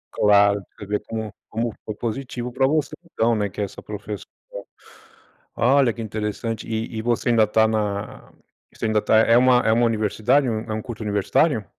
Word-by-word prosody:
Claro, 100 Hz, -1 st, +4 dB
você 105 Hz, -, -8 dB
vê 105 Hz, +1 st, -1 dB
como 110 Hz, -2 st, -6 dB, 0.2 s
como 115 Hz, +1 st, -2 dB
foi 110 Hz, -, -4 dB
positivo 125 Hz, +1 st, -4 dB
para 130 Hz, +1 st, +1 dB
você, 155 Hz, +1 st, 0 dB, 0.2 s
então, 115 Hz, 0 st, +1 dB
né, 105 Hz, -1 st, 0 dB
que -, -, -11 dB
é -, -, +1 dB
essa 100 Hz, -, -7 dB
professora. 105 Hz, -1 st, -7 dB, 1.3 s
Olha, 130 Hz, 0 st, +3 dB
que 115 Hz, -, -7 dB
interessante. 110 Hz, +1 st, -4 dB
E 110 Hz, 0 st, -3 dB
e 110 Hz, -, -2 dB
você 120 Hz, +1 st, 0 dB
ainda 115 Hz, -2 st, +5 dB
está 110 Hz, +1 st, +3 dB
na 105 Hz, -1 st, -3 dB, 0.4 s
você -, -, -5 dB
ainda 110 Hz, -1 st, +2 dB
está 110 Hz, +1 st, +3 dB
é 115 Hz, +1 st, +5 dB
uma 125 Hz, 0 st, +5 dB
é 110 Hz, -, +1 dB
uma 120 Hz, +1 st, +3 dB
universidade, 115 Hz, +5 st, +1 dB
é 120 Hz, -, 0 dB
um 110 Hz, +1 st, -4 dB
um 110 Hz, -, -3 dB
curso 115 Hz, -1 st, -7 dB
universitário? 105 Hz, -, +1 dB
110 Hz, 190 wpm, -22 LUFS, 105-120 Hz, 1.3 s, ainda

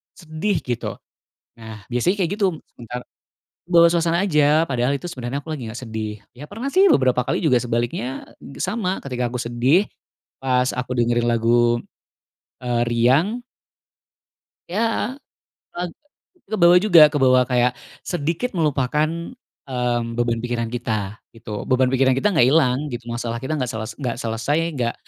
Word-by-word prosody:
sedih, 170 Hz, +4 st, -2 dB
gitu. 120 Hz, -2 st, -3 dB, 0.6 s
Nah, 110 Hz, -2 st, -10 dB
biasanya 125 Hz, +11 st, +1 dB
kayak 170 Hz, -, 0 dB
gitu 200 Hz, -, +3 dB, 0.3 s
sebentar 120 Hz, +1 st, -7 dB, 0.7 s
bawa 170 Hz, -1 st, +6 dB
suasana 170 Hz, 0 st, +1 dB
aja, 150 Hz, -2 st, +3 dB
padahal 125 Hz, 0 st, 0 dB
itu 175 Hz, -, -7 dB
sebenernya 130 Hz, -4 st, -4 dB
aku -, -, -19 dB
lagi 130 Hz, -7 st, -6 dB
nggak 120 Hz, -, -7 dB
sedih. 110 Hz, -3 st, -5 dB, 0.2 s
Ya, 130 Hz, -, -10 dB
pernah, 225 Hz, +6 st, -5 dB
sih, 385 Hz, +2 st, +6 dB
beberapa 130 Hz, -, +3 dB
kali -, -, -1 dB
juga 155 Hz, -7 st, +2 dB
sebaliknya 120 Hz, +2 st, -3 dB, 0.3 s
sama, 190 Hz, 0 st, -1 dB
ketika 125 Hz, -3 st, -3 dB
aku 125 Hz, -, -3 dB
sedih, 125 Hz, -, +2 dB, 0.6 s
pas 125 Hz, -1 st, +2 dB
aku 125 Hz, 0 st, -4 dB
dengerin 120 Hz, 0 st, +2 dB
lagu, 120 Hz, +1 st, +3 dB, 0.8 s
eee, 120 Hz, -1 st, 0 dB
riang 140 Hz, -, +2 dB, 1.3 s
Ya, 225 Hz, +6 st, -1 dB, 0.6 s
pag 175 Hz, 0 st, -3 dB, 0.6 s
kebawa 180 Hz, -4 st, +5 dB
juga 175 Hz, -6 st, +7 dB
kebawa 130 Hz, -3 st, +4 dB
kayak 125 Hz, 0 st, +2 dB, 0.3 s
sedikit 175 Hz, +8 st, -2 dB
melupakan, 150 Hz, -2 st, +1 dB, 0.6 s
mmm, 120 Hz, -3 st, -1 dB
beban 120 Hz, -1 st, 0 dB
pikiran 120 Hz, -1 st, -2 dB
kita, 110 Hz, -3 st, -3 dB, 0.2 s
gitu. 110 Hz, -2 st, -7 dB
Beban 130 Hz, -1 st, +2 dB
pikiran 130 Hz, 0 st, +3 dB
kita 135 Hz, +11 st, +1 dB
nggak 160 Hz, -11 st, +4 dB
hilang, 130 Hz, -3 st, +3 dB
gitu, 120 Hz, -1 st, -6 dB
masalah 120 Hz, 0 st, -3 dB
kita 155 Hz, +4 st, -2 dB
nggak 130 Hz, -, -1 dB
sel 110 Hz, -2 st, -4 dB, 0.2 s
nggak 125 Hz, -5 st, -2 dB
selesai, 115 Hz, +4 st, -1 dB, 0.2 s
nggak 120 Hz, -1 st, -1 dB
130 Hz, 145 wpm, -21 LUFS, 120-165 Hz, 1.3 s, juga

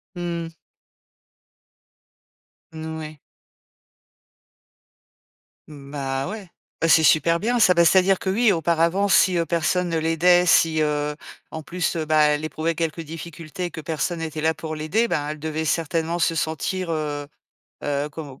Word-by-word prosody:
Mmh. 170 Hz, -1 st, -4 dB, 2.2 s
N 160 Hz, 0 st, -7 dB
oui. 155 Hz, -1 st, -8 dB, 2.5 s
Mmh, 140 Hz, -2 st, -12 dB
bah, 135 Hz, -1 st, -3 dB
ouais, 205 Hz, 0 st, -7 dB, 0.3 s
bah, 165 Hz, -, +2 dB
c'est 165 Hz, -1 st, +5 dB
super 165 Hz, +3 st, +4 dB
bien 240 Hz, +5 st, 0 dB
ça. 185 Hz, -5 st, +6 dB
Bah, 170 Hz, -1 st, +4 dB
c'est-à-dire 190 Hz, +2 st, +4 dB
que 190 Hz, -, -3 dB
oui, 220 Hz, +3 st, +3 dB
auparavant 170 Hz, +3 st, +1 dB
si, 185 Hz, -2 st, +4 dB
heu, 170 Hz, -, +1 dB
personne 175 Hz, +2 st, 0 dB
ne 165 Hz, -, -1 dB
l'aidait 170 Hz, +3 st, +3 dB
si, 160 Hz, -2 st, +4 dB
heu, 150 Hz, -1 st, -1 dB, 0.4 s
en 160 Hz, -, -6 dB
plus, 175 Hz, +3 st, -2 dB
heu, 160 Hz, -2 st, -2 dB
bah, 155 Hz, 0 st, +3 dB
elle 150 Hz, 0 st, 0 dB
éprouvait 160 Hz, +1 st, -2 dB
quelques 165 Hz, 0 st, -2 dB
difficultés 165 Hz, +2 st, -7 dB
que 160 Hz, -, -7 dB
personne 165 Hz, +2 st, -3 dB
était 160 Hz, -1 st, -4 dB
là 160 Hz, +1 st, +2 dB
pour 155 Hz, +1 st, -6 dB
l'aider, 155 Hz, +10 st, 0 dB
ben, 145 Hz, -9 st, -1 dB
elle 155 Hz, 0 st, -6 dB
devait 160 Hz, +1 st, -3 dB
certainement 165 Hz, +2 st, -1 dB
se 165 Hz, -, +1 dB
sentir, 165 Hz, +4 st, -2 dB
heu 150 Hz, -2 st, -3 dB, 0.6 s
heu, 145 Hz, 0 st, -1 dB
com 140 Hz, -3 st, -9 dB
165 Hz, 150 wpm, -23 LUFS, 155-175 Hz, 2.5 s, ça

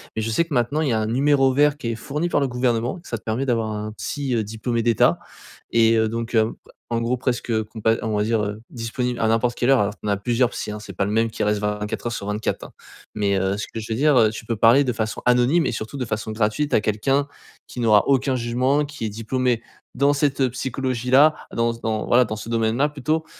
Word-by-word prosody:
Mais 110 Hz, -, -1 dB
je 110 Hz, -, -2 dB
sais 140 Hz, -, +2 dB
que 165 Hz, -, -7 dB
maintenant 125 Hz, +6 st, +1 dB
il 150 Hz, -, 0 dB
y -, -, +1 dB
a 110 Hz, -, +1 dB
un 110 Hz, -, -1 dB
numéro 135 Hz, +2 st, +3 dB
vert 145 Hz, +1 st, +3 dB
qui 120 Hz, -5 st, -4 dB
est 115 Hz, -, -2 dB
fourni 150 Hz, +9 st, -3 dB
par 145 Hz, -, +2 dB
le 140 Hz, -, +1 dB
gouvernement, 125 Hz, +2 st, -1 dB
que 170 Hz, -, -16 dB
ça 115 Hz, -, -3 dB
te -, -, -33 dB
permet 115 Hz, +5 st, -2 dB
d'avoir 115 Hz, -4 st, 0 dB
un 105 Hz, 0 st, -4 dB
psy, 140 Hz, +3 st, -3 dB
heu, 110 Hz, -, +1 dB
diplômé 110 Hz, +3 st, -2 dB
d'état 115 Hz, -3 st, +3 dB, 0.5 s
et 115 Hz, 0 st, +4 dB
heu, 110 Hz, 0 st, +2 dB
donc, 115 Hz, +1 st, -4 dB
heu, 110 Hz, 0 st, +3 dB, 0.4 s
en 115 Hz, 0 st, 0 dB
gros 120 Hz, +2 st, 0 dB
presque 120 Hz, -3 st, -1 dB
compa 110 Hz, +1 st, 0 dB
on 110 Hz, -1 st, -2 dB
va 105 Hz, -, +1 dB
dire, 110 Hz, 0 st, +1 dB
heu, 105 Hz, +1 st, -4 dB
disponible 120 Hz, +1 st, -3 dB
à 110 Hz, -, +2 dB
n'importe 115 Hz, +2 st, +1 dB
quelle 120 Hz, -, +1 dB
heure. 135 Hz, -, +5 dB
Alors, 105 Hz, 0 st, 0 dB
tu -, -, -5 dB
en -, -, 0 dB
as 100 Hz, -, +1 dB
plusieurs 120 Hz, +4 st, +1 dB
psys -, -, -5 dB
hein, 105 Hz, -, -6 dB
c'est 100 Hz, -2 st, -9 dB
pas 95 Hz, -, -1 dB
le 100 Hz, -, -2 dB
même 115 Hz, +1 st, +2 dB
qui -, -, -3 dB
reste 105 Hz, 0 st, +1 dB
24/24 105 Hz, 0 st, -3 dB
hein! -, -, -12 dB, 0.4 s
Mais, 100 Hz, -2 st, +1 dB
heu, 95 Hz, +1 st, 0 dB
ce 105 Hz, -, -3 dB
que 115 Hz, -, -7 dB
je 110 Hz, -, -8 dB
veux 110 Hz, -, -1 dB
dire, 150 Hz, +2 st, +4 dB
heu, 110 Hz, -3 st, +5 dB
tu 110 Hz, +1 st, -8 dB
peux 115 Hz, -, -2 dB
parler 115 Hz, +6 st, +5 dB
de 125 Hz, -, 0 dB
façon 110 Hz, -1 st, -3 dB
anonyme 125 Hz, +7 st, +3 dB
et -, -, 0 dB
surtout, 110 Hz, +5 st, -5 dB
de 130 Hz, -, -2 dB
façon 110 Hz, 0 st, -4 dB
gratuite 115 Hz, +7 st, -1 dB
à -, -, +5 dB
quelqu'un 135 Hz, +7 st, 0 dB, 0.4 s
qui -, -, -9 dB
n'aura 110 Hz, -3 st, +4 dB
aucun 135 Hz, -1 st, +2 dB
jugement, 130 Hz, +4 st, +1 dB
qui 145 Hz, -5 st, -6 dB
est -, -, -1 dB
diplômé 115 Hz, +2 st, -1 dB, 0.3 s
dans 140 Hz, +2 st, +3 dB
cette 140 Hz, -2 st, +1 dB
psychologie-là, 130 Hz, +3 st, +2 dB, 0.2 s
dans 115 Hz, 0 st, 0 dB
ce 115 Hz, -, -11 dB
dans 110 Hz, -1 st, -2 dB
voilà, 125 Hz, +1 st, +5 dB
dans 110 Hz, -, -4 dB
ce 110 Hz, +2 st, -8 dB
domaine-là 115 Hz, +5 st, +1 dB
plutôt. 155 Hz, +3 st, -2 dB
115 Hz, 250 wpm, -22 LUFS, 110-130 Hz, 0.5 s, heure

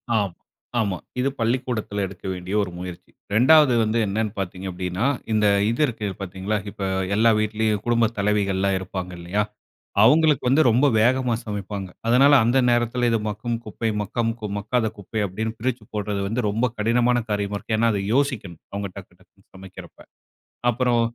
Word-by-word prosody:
ஆம். 100 Hz, -5 st, 0 dB, 0.5 s
ஆமா. 100 Hz, -4 st, 0 dB, 0.2 s
இது 130 Hz, +2 st, +2 dB
பள்ளிக்கூடத்துல 115 Hz, -3 st, -1 dB
எடுக்க 95 Hz, -1 st, -13 dB
வேண்டிய 90 Hz, +1 st, -6 dB
ஒரு 90 Hz, -, -5 dB
முயற்சி. 90 Hz, -1 st, -8 dB, 0.2 s
2 135 Hz, +4 st, +6 dB
வந்து 110 Hz, +1 st, 0 dB
என்னென்னு 105 Hz, +2 st, -1 dB
பார்த்தீங்க 95 Hz, 0 st, -5 dB
அப்படின்னா, 90 Hz, +5 st, -2 dB, 0.3 s
இந்த 105 Hz, -1 st, +2 dB, 0.2 s
இது 115 Hz, +6 st, -1 dB
இருக்கு 115 Hz, -5 st, -4 dB
பாத்தீங்களா, 95 Hz, +3 st, -2 dB
இப்ப 100 Hz, -, -11 dB, 0.3 s
எல்லா 115 Hz, +2 st, +5 dB
வீட்லயும் 110 Hz, -1 st, 0 dB
குடும்பத் 115 Hz, -1 st, +2 dB
தலைவிகள்லாம் 100 Hz, -2 st, +1 dB
இருப்பாங்க, 95 Hz, -1 st, -5 dB
இல்லையா? 95 Hz, +5 st, -1 dB, 0.6 s
அவங்களுக்கு 150 Hz, +5 st, +5 dB
வந்து 145 Hz, +5 st, +5 dB
ரொம்ப 125 Hz, +5 st, +4 dB
வேகமா 125 Hz, +1 st, +2 dB
சமைப்பாங்க. 100 Hz, -2 st, -5 dB, 0.2 s
அதனால 135 Hz, +5 st, +6 dB
அந்த 120 Hz, +3 st, +2 dB
நேரத்துல, 120 Hz, 0 st, +1 dB
இது 115 Hz, -, +2 dB
மக்கும் 115 Hz, +3 st, -3 dB
குப்பை, 110 Hz, +1 st, -3 dB
மக்கம் 115 Hz, +2 st, -1 dB
கு 105 Hz, -, -3 dB
மக்காத 110 Hz, +2 st, 0 dB
குப்பை 105 Hz, +2 st, -4 dB
அப்படின்னு 110 Hz, +4 st, -3 dB
பிரிச்சு 125 Hz, -1 st, -2 dB
போடுறது 105 Hz, -1 st, -2 dB
வந்து, 115 Hz, +3 st, -1 dB
ரொம்ப 115 Hz, +5 st, +1 dB
கடினமான 120 Hz, +3 st, +2 dB
காரியமா 100 Hz, 0 st, -1 dB
இருக்கு. 110 Hz, +2 st, -2 dB
ஏன்னா 115 Hz, 0 st, +4 dB
அது 100 Hz, -, -1 dB
யோசிக்கணும். 125 Hz, -, -1 dB
அவங்க 100 Hz, 0 st, -3 dB
டக்கு, 95 Hz, -, -11 dB
டக்குனு -, -, -28 dB
சமைக்குறப்ப. 95 Hz, -1 st, -12 dB, 0.7 s
அப்புறம், 120 Hz, 0 st, +1 dB
110 Hz, 155 wpm, -23 LUFS, 100-120 Hz, 0.7 s, 2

